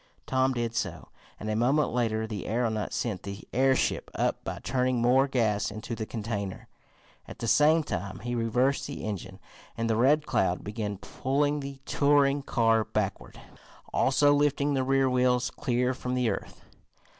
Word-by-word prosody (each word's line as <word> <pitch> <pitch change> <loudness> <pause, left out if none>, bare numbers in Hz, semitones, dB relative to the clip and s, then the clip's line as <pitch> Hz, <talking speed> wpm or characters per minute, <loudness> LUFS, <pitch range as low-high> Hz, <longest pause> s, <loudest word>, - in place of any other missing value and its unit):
Tom 130 0 +1
did 120 -2 -2
so, - - -4 0.3
and 110 - -6
a 110 - 0
moment 130 +5 +2
later 110 -2 0
the 105 -4 -5
aeronaut 110 -2 -1
sent 110 -6 -2
the 100 0 -8
airship 130 +1 +2
up - - 0
by - - -4
turning 125 -1 +1
more 130 +3 +4
gas 110 -6 +1
into 110 +3 -6
the 110 -1 -4
container. 105 -4 -4 0.6
At - - -9
the 115 - -4
same 155 +5 +5
time 95 - -5
he 120 +1 -3
reversed 120 +4 +1
the 140 - -6
engine 105 -4 -5 0.4
and 115 0 -1
the 110 - +1
Red 145 +6 +3
Cloud 95 -9 0
began 105 -1 -4
pulling 145 +7 -1
the 135 -1 -7
touring 140 -1 +3
car 115 -4 +2
backward, - - -3 0.5
also 145 +2 +4
lifting 145 0 +2
the 135 -1 +1
rear 135 0 +2
wheels 125 -1 +2
clear 125 0 0
from 125 0 -4
the 125 -3 +1
earth. - - -7
125 Hz, 165 wpm, -28 LUFS, 110-135 Hz, 0.6 s, same